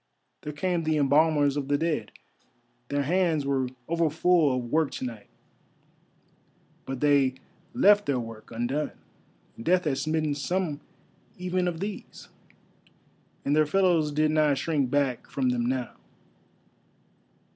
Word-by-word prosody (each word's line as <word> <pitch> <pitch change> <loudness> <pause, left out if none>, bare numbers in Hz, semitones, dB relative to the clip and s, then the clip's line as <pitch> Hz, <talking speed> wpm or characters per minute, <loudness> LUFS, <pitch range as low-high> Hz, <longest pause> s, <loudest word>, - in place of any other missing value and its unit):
There 150 - -5
came 175 +3 -1
the 155 -1 +1
embalmers 145 0 +3
of 145 -2 -3
the 145 0 +2
Dead; 155 -9 -2 0.8
their 145 0 0
hands 165 -2 +1
were 135 -2 0 0.2
overfull 165 -3 +2
of 120 -1 -5
work 160 -2 +2
to - - -4
night, 115 -4 -7 1.6
but 135 -1 -5
they 140 -3 +3 0.4
left 205 -4 +5
their 135 -3 +1
work 115 -2 -9
undone; 120 +6 -2 0.7
Death 180 +8 +2
had 135 -3 0
smitten 155 0 0
some 155 0 -2 0.6
even 180 0 -1
of 170 -1 -3
these, 200 0 -7 1.2
and 145 - +2
their 155 -1 +3
fellows 170 -3 +2
did 155 +1 +2
not 150 -2 +3
shrink 140 -2 0
back 140 -3 0
from 130 -2 0
them 120 -1 0
now. 125 -1 -2
150 Hz, 130 wpm, -27 LUFS, 135-165 Hz, 1.6 s, left